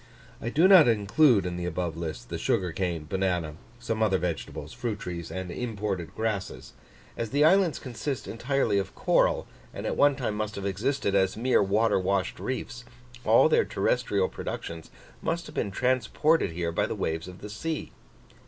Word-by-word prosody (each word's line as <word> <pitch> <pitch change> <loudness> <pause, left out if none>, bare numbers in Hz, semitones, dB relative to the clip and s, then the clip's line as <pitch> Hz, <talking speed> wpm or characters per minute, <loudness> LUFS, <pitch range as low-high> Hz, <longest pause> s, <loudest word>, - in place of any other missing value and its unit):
I 115 - -2
do 160 +9 +4
not 185 -7 +8
include 115 - +4
in 90 -1 -3
the 90 0 -3
above 85 -1 -2
list 80 -2 -6
the - - -4
sugar 90 -2 0
cane, 85 -3 -2
banana, 90 -4 -1 0.2
some 115 -2 -3
other 100 -3 +3
vegetables, 85 -8 -4
fruit 115 -4 -3
trees, 85 -4 -6
and 95 -1 -5
imported 100 -7 -4
grasses. 110 -4 -3 0.4
As 115 -1 -3
the 145 +4 +3
islands 185 -1 +4
consist 125 -2 -5
entirely 120 -3 0
of 95 - -5
coral, - - +2 0.3
and - - -7
at - - -1
one 145 -1 +4
time 125 -6 -2
must 105 0 -3
have 100 - -5
existed 100 +3 -1
as 95 0 +2
mere 125 +3 +3
water 105 +2 +2
washed 95 0 -1
reefs, 125 -1 -4 0.4
all - - +6
their - - +4
terrestrial 105 -6 0
productions 85 -1 -6 0.3
must 170 +1 -2
have - - -10
been - - -1
transported 130 +8 +1
here 85 0 -2
by 85 - 0
the - - -3
waves 80 +2 -2
of 90 0 -11
the 105 - -7
sea. 155 +8 -4
105 Hz, 175 wpm, -27 LUFS, 90-125 Hz, 0.4 s, not